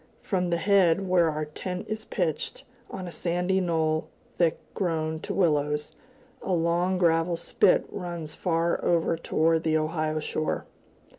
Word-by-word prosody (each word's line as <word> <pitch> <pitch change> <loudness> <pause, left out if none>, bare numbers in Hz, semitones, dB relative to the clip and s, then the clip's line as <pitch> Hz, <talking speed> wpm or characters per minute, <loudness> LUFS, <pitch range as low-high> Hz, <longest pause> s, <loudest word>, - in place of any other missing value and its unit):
From 180 -3 0
the 170 - +1
head, 190 0 +3
where 175 -3 +4
our 155 0 -2
tent 180 +4 -5
is 215 0 -4
pitched 165 -6 -2 0.3
on 185 - -6
a - - -6
sandy 180 +3 0
knoll 160 -3 0 0.3
thick 170 -2 +3 0.2
grown 160 -4 -1
to - - -6
willows, 150 -4 +1 0.5
a 190 - -2
long 175 +2 +1
gravel 170 -1 +2
spit 170 - +3
runs 170 -4 -5
far 170 -1 0
over 165 -1 +2
toward 165 0 +1
the 160 -1 +2
Ohio 155 0 -1
shore. 155 0 -2
170 Hz, 145 wpm, -27 LUFS, 155-180 Hz, 0.5 s, where